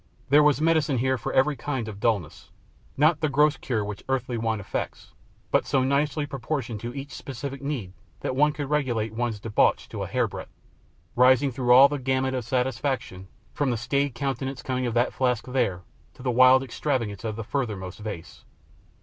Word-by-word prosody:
There 145 +2 +7
was 150 -1 +4
medicine 155 -3 +2
here 130 +2 +1
for 115 - -4
every 140 +3 +3
kind 130 -3 -3
of 105 -2 -7
dulness 105 -8 -1 0.5
not 155 +2 +4
the 155 - +1
gross 150 +2 +3
cure 110 -6 -2
which 105 -1 -7
earthly 130 -2 -1
wine 115 -1 -1
effects, 100 - -5 0.4
but - - +2
so 135 -2 +2
nicely 145 +2 +1
proportioned 135 -5 -4
to 120 +3 -6
each 140 0 -6
specific 135 +1 -6
need 135 -10 -4 0.3
that 130 - -2
one 150 +2 +4
could 145 -1 -5
regulate 120 -7 0
one's 115 -2 -2
debauch 105 0 +1
to - - -6
a - - -3
hairbreadth, - - -3 0.6
rising 130 +2 +5
through 125 -1 0
all 130 +3 +9
the 145 0 -3
gamut 130 0 0
of 130 -2 -2
satisfaction, 125 -6 -2 0.3
from 145 -2 0
the 120 - 0
staid 140 +3 -1
contentment 135 +1 -3
coming 130 -1 -1
of 120 - -3
that 120 +1 +2
flask 125 -3 0
there 120 -9 -1 0.3
to 125 - -13
the 125 - +1
wild 130 +2 +6
extravagances 120 -5 -2
of 110 -2 -3
the 115 - -5
furthermost 105 -7 -4
vase. 100 -6 -8
130 Hz, 185 wpm, -26 LUFS, 115-140 Hz, 0.6 s, all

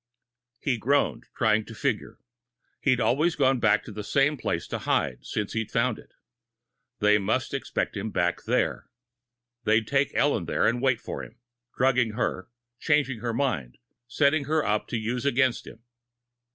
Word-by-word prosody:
He 130 -5 -1
groaned, 140 +6 +1
trying 110 -1 +3
to 115 - -10
figure. - - -2 0.6
He'd 130 -3 +2
always 155 +8 +2
gone 135 -3 +3
back 105 -2 +3
to - - -9
the 105 0 -6
same 140 +7 +2
place - - -2
to - - -3
hide, 60 -3 -1
since 105 - -3
he'd 110 -1 -2
found 115 -1 0
it. - - -18 0.8
They 105 0 +4
must 95 - -1
expect - - -2
him 110 - -3
back 90 -3 -1
there. - - 0 0.7
They'd 110 +1 +3
take 140 0 +1
Ellen 120 -6 +2
there - - 0
and 120 +1 0
wait 130 -3 +2
for - - -6
him, 115 - -12 0.4
drugging 125 -4 +2
her, 100 -4 -2 0.3
changing 140 -6 +1
her 120 +1 -2
mind, 110 - -2 0.3
setting 140 +4 +2
her 155 +1 +1
up 105 +1 0
to 120 - -2
use 115 +3 -2
against 130 -2 +1
him. 115 - -12
120 Hz, 165 wpm, -26 LUFS, 110-135 Hz, 0.8 s, They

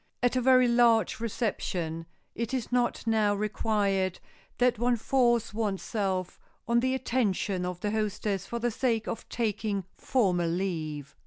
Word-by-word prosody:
At 245 +1 +3
a 255 - +2
very 255 0 +5
large 235 -2 +3
reception 185 -8 -2 0.3
it 235 +2 -3
is 250 -3 -3
not 245 -2 0
now 215 -2 +2
required 200 -3 0 0.4
that 245 -3 +2
one 245 +1 +3
force 240 -2 +2
one's 210 -3 -2
self 190 -4 -2 0.3
on 235 0 +3
the 260 +2 +1
attention 205 -7 0
of 180 0 -5
the 205 - -1
hostess 210 -2 -2
for 235 - -3
the 240 +1 0
sake 225 -2 0
of - - -5
taking 215 -3 -1
formal 180 -9 +1
leave. 155 -6 -3
215 Hz, 150 wpm, -28 LUFS, 190-240 Hz, 0.4 s, very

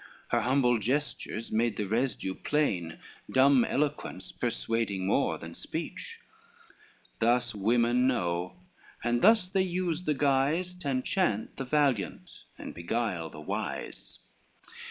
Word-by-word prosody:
Her 120 - +2
humble 125 -1 +3
gestures 125 -1 -2
made 115 +1 +1
the 105 - -1
residue 110 -2 -1
plain, 95 - -1 0.3
Dumb 130 -1 +5
eloquence, 140 -11 -2
persuading 115 -5 -1
more 95 - +2
than - - -9
speech: - - -6 1.0
Thus 120 +1 +2
women 120 +4 +2
know, 90 -8 -1 0.5
and 120 +1 +1
thus 215 -2 +5
they 190 +1 +1
use 180 -2 -1
the 150 - +1
guise, 145 +6 +2
To 180 -6 -5
enchant 130 - 0
the 135 - -3
valiant, 130 - 0
and - - -7
beguile 85 -2 -2
the 75 - -10
wise. - - -5
120 Hz, 120 wpm, -29 LUFS, 105-145 Hz, 1.0 s, Dumb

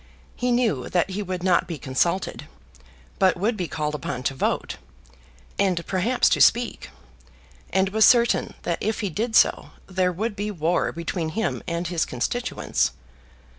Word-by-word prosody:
He 250 0 -1
knew 220 - +1
that 180 +1 +1
he 200 +3 -3
would 185 -2 -4
not 180 -2 +3
be 170 -3 -5
consulted, 170 +8 -1 0.7
but 185 -1 +4
would 215 +6 0
be 180 -4 -3
called 150 -1 -3
upon 130 -4 -4
to 135 - 0
vote, 130 - -2 0.8
and 185 -4 +1
perhaps 210 +7 +1
to - - +2
speak; 240 +1 +3 0.8
and 190 0 +2
was 220 +2 +3
certain 235 0 +4
that 170 - -1
if 220 +2 -1
he 200 -3 -2
did 220 +6 -2
so, - - +4 0.2
there 185 -1 0
would 210 +5 -3
be 205 +1 -3
war 170 -3 0
between 170 0 -3
him 220 +7 -2
and 170 +1 -2
his 170 -1 0
constituents. 125 - -1
185 Hz, 160 wpm, -24 LUFS, 170-215 Hz, 0.8 s, but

